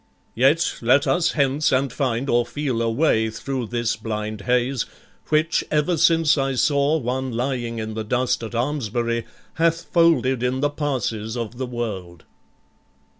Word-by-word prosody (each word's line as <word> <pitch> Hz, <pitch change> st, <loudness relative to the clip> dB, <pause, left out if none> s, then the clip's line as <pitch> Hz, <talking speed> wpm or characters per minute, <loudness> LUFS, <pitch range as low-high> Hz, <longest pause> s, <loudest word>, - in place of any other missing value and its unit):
Yet 140 Hz, +8 st, +2 dB
let 130 Hz, +5 st, +4 dB
us 165 Hz, +5 st, +2 dB
hence, 140 Hz, 0 st, +1 dB
and 130 Hz, -1 st, +1 dB
find 130 Hz, -2 st, -1 dB
or 120 Hz, -2 st, +3 dB
feel 130 Hz, -1 st, -2 dB
a 115 Hz, -, +1 dB
way 115 Hz, -3 st, +2 dB
Thro' 130 Hz, +2 st, -4 dB
this 120 Hz, 0 st, -1 dB
blind 110 Hz, -1 st, -4 dB
haze, 125 Hz, +3 st, 0 dB, 0.4 s
which 155 Hz, +2 st, +2 dB
ever 155 Hz, +4 st, +1 dB
since 165 Hz, -1 st, +4 dB
I 135 Hz, -1 st, 0 dB
saw 140 Hz, +3 st, +2 dB
One 130 Hz, -1 st, -2 dB
lying 120 Hz, -1 st, -2 dB
in 110 Hz, 0 st, -4 dB
the 110 Hz, 0 st, -3 dB
dust 125 Hz, +3 st, 0 dB
at 115 Hz, +1 st, -6 dB
Almesbury, 115 Hz, -3 st, -1 dB, 0.4 s
Hath 165 Hz, 0 st, +2 dB
folded 165 Hz, -7 st, +2 dB
in 125 Hz, +1 st, 0 dB
the 145 Hz, 0 st, +1 dB
passes 125 Hz, -6 st, -2 dB
of 120 Hz, +1 st, -5 dB
the 130 Hz, -, -2 dB
world." 100 Hz, -9 st, -5 dB
125 Hz, 155 wpm, -22 LUFS, 115-145 Hz, 0.4 s, let